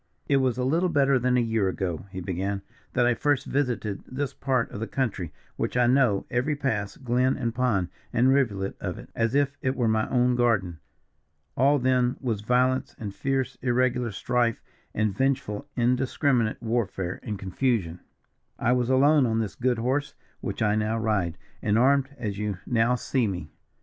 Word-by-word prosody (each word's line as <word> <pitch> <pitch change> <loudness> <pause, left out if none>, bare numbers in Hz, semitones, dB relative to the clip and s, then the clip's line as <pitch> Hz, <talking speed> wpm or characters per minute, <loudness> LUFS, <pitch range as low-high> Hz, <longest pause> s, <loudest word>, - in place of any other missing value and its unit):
"It 140 - +3
was 130 -3 +1
a 125 - 0
little 165 +8 +2
better 140 -4 +3
than 125 +1 +2
a - - +4
year 110 -4 +1
ago," 95 -1 -3
he 95 -1 -6
began, 95 +2 -3 0.3
"that 125 -1 +3
I 120 - +4
first 145 +3 +1
visited 125 -7 -1
this 140 +1 -3
part 130 -4 0
of - - -6
the 115 - -3
country, 100 - -2 0.3
which - - -1
I 125 - +4
know 120 -5 +3
every 130 +5 +1
pass, 110 -8 -2
glen, 125 +1 +1
and 120 -4 -2
pond, 115 -8 +1 0.2
and 125 +2 +3
rivulet 100 -8 0
of - - -3
it - - -12
as 115 +2 0
if 140 0 +2
it 130 +1 0
were 120 -4 +1
my 110 0 +1
own 125 -1 +3
garden. 100 -9 +1 0.8
All 140 +3 +4
then 125 -1 +2
was 115 -6 -2
violence, 125 +3 +1
and 105 -3 -6
fierce, 135 +1 -2
irregular 125 -1 +1
strife, 120 +3 0 0.3
and 110 -3 0
vengeful 135 -1 -1
indiscriminate 125 -1 +1
warfare 105 -6 -2
and 105 -4 -4
confusion. 95 -3 -1 0.6
"I 120 - +1
was 125 -1 +1
alone 140 +1 +5
on 110 -1 0
this 110 -4 -1
good 120 +2 0
horse 130 +5 -1 0.2
which - - -3
I 105 -1 +3
now 110 +1 0
ride, 100 -7 0 0.2
and 105 +1 +2
armed 135 +2 +3
as 105 -3 -4
you 105 -3 -2
now 120 +1 +2
see 125 -1 0
me. 90 -6 -5
120 Hz, 180 wpm, -26 LUFS, 105-130 Hz, 0.8 s, alone